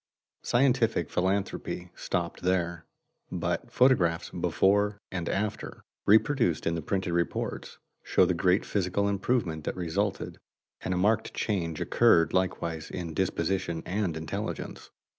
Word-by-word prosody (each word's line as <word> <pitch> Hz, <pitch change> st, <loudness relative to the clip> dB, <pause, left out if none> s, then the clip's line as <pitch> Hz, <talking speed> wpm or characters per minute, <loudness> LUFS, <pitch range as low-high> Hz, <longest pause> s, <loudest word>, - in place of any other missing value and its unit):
Scientific 120 Hz, -, +2 dB
philanthropy 95 Hz, -1 st, -1 dB
stopped 85 Hz, -1 st, -3 dB
there, 85 Hz, -2 st, -1 dB, 0.4 s
but -, -, -2 dB
photographs 95 Hz, -11 st, +3 dB
"before 105 Hz, +1 st, +2 dB
and 90 Hz, -3 st, -3 dB
after," 105 Hz, +1 st, -3 dB, 0.2 s
reproduced 110 Hz, -, +3 dB
in 85 Hz, -, +1 dB
the 85 Hz, -, -2 dB
printed 95 Hz, +2 st, -1 dB
reports, 85 Hz, 0 st, -2 dB, 0.2 s
show -, -, +3 dB
the 90 Hz, -, +1 dB
great 90 Hz, +2 st, +2 dB
physical 100 Hz, +1 st, 0 dB
improvement 100 Hz, -5 st, 0 dB
that -, -, -2 dB
resulted, 95 Hz, +3 st, -2 dB, 0.4 s
and 95 Hz, -, -1 dB
a -, -, -1 dB
marked 110 Hz, +4 st, +1 dB
change 85 Hz, -7 st, -1 dB
occurred 80 Hz, -1 st, +4 dB
likewise 85 Hz, -4 st, -1 dB
in 85 Hz, -3 st, -5 dB
disposition 85 Hz, -1 st, -1 dB
and 95 Hz, -4 st, -1 dB
intelligence. 80 Hz, 0 st, -5 dB
95 Hz, 120 wpm, -28 LUFS, 85-100 Hz, 0.4 s, occurred